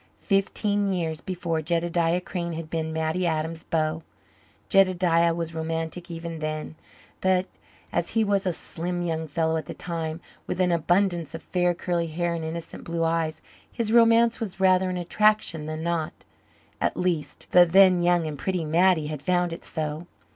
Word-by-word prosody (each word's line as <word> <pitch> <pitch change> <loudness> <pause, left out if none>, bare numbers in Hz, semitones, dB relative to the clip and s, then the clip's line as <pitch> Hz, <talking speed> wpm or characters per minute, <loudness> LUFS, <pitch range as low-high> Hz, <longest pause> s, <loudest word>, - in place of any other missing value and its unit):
Fifteen 200 0 +1
years 165 -3 -2
before 170 -3 -2
Jedediah 170 +1 +1
Crane 175 -2 -4
had 160 0 -6
been 160 -1 -2
Mattie 160 +3 0
Adams's 160 0 -2
beau. 155 0 0 0.7
Jedediah 180 -4 +4
was 165 -1 -4
romantic 165 +2 -4
even 165 -1 -6
then, 155 0 -4 0.5
but, 185 0 +2 0.5
as - - 0
he 225 - +5
was 200 -2 +1
a - - +2
slim 175 +1 -4
young 160 -2 -2
fellow 160 +2 0
at 160 - -5
the - - -6
time, 165 -2 -4 0.3
with - - -3
an 180 -1 +3
abundance 170 -1 +1
of 165 - -8
fair, 180 -1 +1
curly 170 -1 -1
hair 170 +2 -1
and 165 -1 -4
innocent 165 +1 -6
blue 170 0 -2
eyes, 165 -1 -1 0.3
his 225 -2 -1
romance 230 0 +5
was 200 -5 -5
rather 185 -1 +4
an 180 - -2
attraction 175 -3 +1
than 155 0 -4
not. 170 -2 -1 0.7
At - - 0
least 175 -4 -2
the 180 - +8
then 180 +1 +5
young 175 -1 +3
and 150 -3 -5
pretty 185 -4 -1
Mattie 170 0 +3
had 150 -2 -5
found 180 0 +1
it - - -9
so. 155 +1 -4
170 Hz, 170 wpm, -25 LUFS, 160-180 Hz, 0.7 s, the